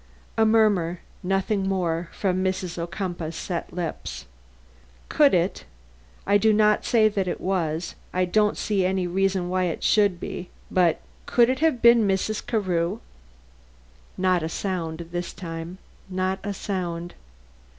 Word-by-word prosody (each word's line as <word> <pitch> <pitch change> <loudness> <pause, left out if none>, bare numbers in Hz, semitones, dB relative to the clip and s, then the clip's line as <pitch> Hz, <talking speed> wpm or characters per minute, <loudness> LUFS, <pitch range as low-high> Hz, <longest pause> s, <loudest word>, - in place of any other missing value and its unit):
A 220 0 +4
murmur, 205 -6 +3 0.2
nothing 195 +1 0
more, 170 -3 -1
from 185 -2 -1
Mrs. 185 -2 -2
Ocumpaugh's 170 -2 -4
set 175 0 -4
lips. 170 -2 -5 0.8
"Could 290 -8 +5
it 175 +2 0 0.6
I 205 0 +4
do 220 +1 +4
not 210 0 +3
say 220 -2 +4
that 200 -3 -1
it - - -2
was 170 -3 -1 0.2
I 185 0 +1
don't 210 +3 +2
see 200 -3 0
any 185 0 +1
reason 190 0 0
why 185 0 0
it 170 - -3
should 205 -5 +3
be 180 - -6 0.2
but 175 -3 +3 0.3
could 240 0 +4
it 260 - -2
have 310 -7 +1
been 235 -2 +7
Mrs. 195 +3 0
Carew?" 185 -3 0 1.2
Not 185 -1 +2
a 160 - -2
sound 170 -3 -3
this 175 0 -4
time, 165 0 -7 0.3
not 185 +1 -1
a 205 - -2
sound. 175 -4 -4
185 Hz, 140 wpm, -25 LUFS, 175-205 Hz, 1.2 s, been